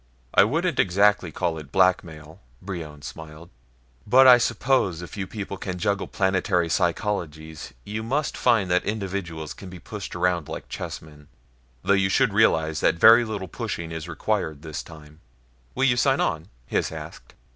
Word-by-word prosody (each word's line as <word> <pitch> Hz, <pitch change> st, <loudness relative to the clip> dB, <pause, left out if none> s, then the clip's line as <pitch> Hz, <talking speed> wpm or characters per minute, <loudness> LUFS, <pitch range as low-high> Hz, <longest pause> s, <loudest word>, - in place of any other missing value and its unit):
"I 95 Hz, -, +6 dB
wouldn't 165 Hz, -, -1 dB
exactly 100 Hz, -1 st, +3 dB
call 85 Hz, -1 st, -2 dB
it 75 Hz, -3 st, -12 dB
blackmail," 85 Hz, -3 st, 0 dB, 0.2 s
Brion 80 Hz, -6 st, -7 dB
smiled, 80 Hz, +3 st, -10 dB, 0.6 s
"but 130 Hz, +5 st, +6 dB
I 125 Hz, -1 st, +9 dB
suppose 115 Hz, -9 st, 0 dB
if 85 Hz, -, -9 dB
you 100 Hz, -2 st, -4 dB
people 100 Hz, -1 st, -6 dB
can 95 Hz, -1 st, -5 dB
juggle 100 Hz, +1 st, -1 dB
planetary 95 Hz, -2 st, 0 dB
psychologies, 80 Hz, -4 st, -2 dB
you 105 Hz, +2 st, -5 dB
must 135 Hz, +7 st, -1 dB
find 110 Hz, -7 st, +2 dB
that 90 Hz, -, +3 dB
individuals 95 Hz, -7 st, -4 dB
can 95 Hz, -, -11 dB
be 90 Hz, -, -9 dB
pushed 100 Hz, +1 st, -8 dB
around 90 Hz, -3 st, 0 dB
like -, -, -7 dB
chessmen. 75 Hz, -2 st, -8 dB, 0.6 s
Though 100 Hz, -, +3 dB
you 95 Hz, -1 st, +2 dB
should 125 Hz, +2 st, +2 dB
realize 80 Hz, -7 st, +2 dB
that -, -, +2 dB
very 115 Hz, +7 st, +7 dB
little 105 Hz, -4 st, -5 dB
pushing 85 Hz, 0 st, -5 dB
is 80 Hz, +1 st, -6 dB
required 80 Hz, -4 st, -2 dB
this 80 Hz, -2 st, -5 dB
time." 75 Hz, -1 st, -14 dB, 0.6 s
"Will 135 Hz, -, 0 dB
you 125 Hz, -2 st, +3 dB
sign 135 Hz, +2 st, +2 dB
on?" 80 Hz, -4 st, -1 dB, 0.2 s
Hys -, -, 0 dB
asked. -, -, -10 dB
95 Hz, 160 wpm, -24 LUFS, 80-105 Hz, 0.6 s, I